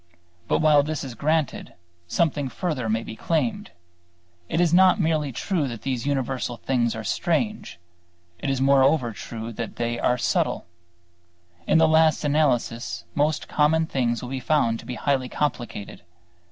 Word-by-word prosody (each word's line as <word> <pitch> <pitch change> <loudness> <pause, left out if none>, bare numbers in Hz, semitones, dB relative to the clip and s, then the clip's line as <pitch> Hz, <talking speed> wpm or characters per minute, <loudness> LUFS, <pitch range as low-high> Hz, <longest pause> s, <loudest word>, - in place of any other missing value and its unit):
But - - +1
while 150 -2 +6
this 155 +1 -3
is 130 -3 -6
granted, 155 +4 -1 0.3
something 145 - 0
further 140 -8 -3
may 110 +1 0
be 110 - -8
claimed. 145 -1 -1 0.8
It - - 0
is 175 -2 +3
not 185 +3 +6
merely 155 -4 +1
true 155 - -1
that 115 -3 -7
these 130 -1 -2
universal 130 -3 -2
things 120 -1 0
are 115 - -5
strange; 195 - -1 0.6
it 140 - -3
is 135 -1 0
moreover 135 -1 +3
true 115 +2 -7
that 115 0 -5
they 120 0 -2
are 125 - +2
subtle. - - 0 1.0
In - - +4
the 160 0 +5
last 160 0 +4
analysis 120 - 0
most 150 +1 0
common 160 +2 +2
things 120 -6 -1
will 125 - -6
be 135 - -2
found 125 -4 +1
to 115 - -12
be 125 - -4
highly 130 -2 0
complicated. 120 -8 -3
135 Hz, 155 wpm, -24 LUFS, 120-155 Hz, 1.0 s, while